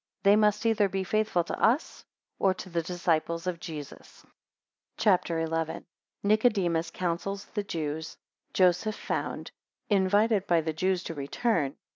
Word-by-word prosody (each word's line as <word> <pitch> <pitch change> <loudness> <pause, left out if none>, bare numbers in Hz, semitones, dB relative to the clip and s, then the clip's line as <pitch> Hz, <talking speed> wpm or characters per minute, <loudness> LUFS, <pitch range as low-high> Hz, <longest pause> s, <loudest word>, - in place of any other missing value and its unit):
They 200 0 +6
must 210 +1 +2
either 220 -3 +3
be 190 0 -2
faithful 215 -2 +1
to - - -5
us 245 +8 +2 0.4
or 190 -1 +3
to 185 - -9
the 170 0 0
disciples 170 -1 -1
of 180 -2 -2
Jesus. 150 -4 -9 0.7
CHAPTER 180 -6 +2
XI. 160 - -7 0.2
1 - - -9 0.4
Nicodemus 200 -6 +2
counsels 185 +3 -3
the 210 - 0
Jews. 160 -4 -3
6 - - -26 0.4
Joseph 185 +4 +3
found. - - -4 0.4
11 195 -2 +4
Invited 205 +1 +2
by 170 -2 +3
the 160 0 -2
Jews 185 +3 0
to - - -5
return. 145 - -1
185 Hz, 150 wpm, -28 LUFS, 165-205 Hz, 0.7 s, They